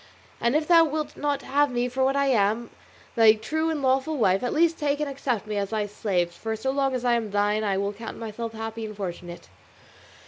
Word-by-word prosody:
And 235 Hz, +4 st, +1 dB
if 305 Hz, 0 st, +1 dB
thou 335 Hz, -2 st, +7 dB
wilt 310 Hz, -1 st, -3 dB
not 285 Hz, -2 st, -2 dB
have 290 Hz, +1 st, +2 dB
me 245 Hz, 0 st, 0 dB
for 260 Hz, +2 st, -1 dB
what 270 Hz, +1 st, +2 dB
I 280 Hz, 0 st, +2 dB
am, 225 Hz, -2 st, +1 dB, 0.4 s
thy 225 Hz, -2 st, +7 dB
true 310 Hz, +10 st, -2 dB
and 305 Hz, -3 st, -2 dB
lawful 270 Hz, +4 st, +1 dB
wife, 195 Hz, -5 st, +3 dB
at 245 Hz, -, -1 dB
least 330 Hz, +1 st, +2 dB
take 290 Hz, -1 st, 0 dB
and 300 Hz, -, -1 dB
accept 260 Hz, -6 st, -2 dB
me 210 Hz, -1 st, -3 dB
as 200 Hz, -1 st, -1 dB
thy 215 Hz, -2 st, -1 dB
slave, 195 Hz, -4 st, -1 dB
for 220 Hz, +6 st, -4 dB
so 265 Hz, +5 st, -2 dB
long 270 Hz, -1 st, 0 dB
as 250 Hz, -1 st, -3 dB
I 240 Hz, -, +3 dB
am 230 Hz, -2 st, 0 dB
thine 205 Hz, +1 st, +1 dB
I 200 Hz, -2 st, 0 dB
will 200 Hz, +1 st, -1 dB
count 225 Hz, +2 st, -8 dB
myself 225 Hz, 0 st, -5 dB
happy 225 Hz, 0 st, -5 dB
and 215 Hz, -1 st, -7 dB
fortunate. 175 Hz, -3 st, -7 dB
235 Hz, 230 wpm, -25 LUFS, 210-280 Hz, 0.4 s, thou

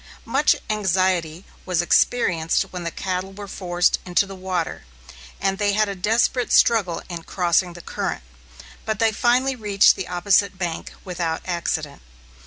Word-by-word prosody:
Much 275 Hz, +6 st, +3 dB, 0.2 s
anxiety 185 Hz, -4 st, 0 dB, 0.2 s
was 180 Hz, -3 st, -1 dB
experienced 175 Hz, -2 st, +2 dB
when 180 Hz, -1 st, -5 dB
the 170 Hz, -, -2 dB
cattle 185 Hz, +2 st, -4 dB
were 205 Hz, +1 st, -8 dB
forced 175 Hz, -2 st, 0 dB
into 180 Hz, +2 st, +2 dB
the 195 Hz, -, -9 dB
water, 185 Hz, -3 st, -3 dB, 0.6 s
and 195 Hz, 0 st, -1 dB
they 205 Hz, -1 st, +2 dB
had 215 Hz, +1 st, +2 dB
a 200 Hz, -, -3 dB
desperate 225 Hz, +6 st, +1 dB
struggle 200 Hz, -7 st, +3 dB
in 175 Hz, -2 st, -6 dB
crossing 175 Hz, +1 st, 0 dB
the 175 Hz, -, -10 dB
current; 60 Hz, -, -4 dB, 0.6 s
but 220 Hz, -1 st, -2 dB
they 225 Hz, +1 st, +3 dB
finally 250 Hz, +4 st, +2 dB
reached 205 Hz, -4 st, +4 dB
the 190 Hz, -, -5 dB
opposite 185 Hz, +2 st, +2 dB
bank 175 Hz, -3 st, -4 dB
without 170 Hz, -3 st, -3 dB
accident. 160 Hz, -5 st, -3 dB
185 Hz, 150 wpm, -22 LUFS, 175-205 Hz, 0.6 s, reached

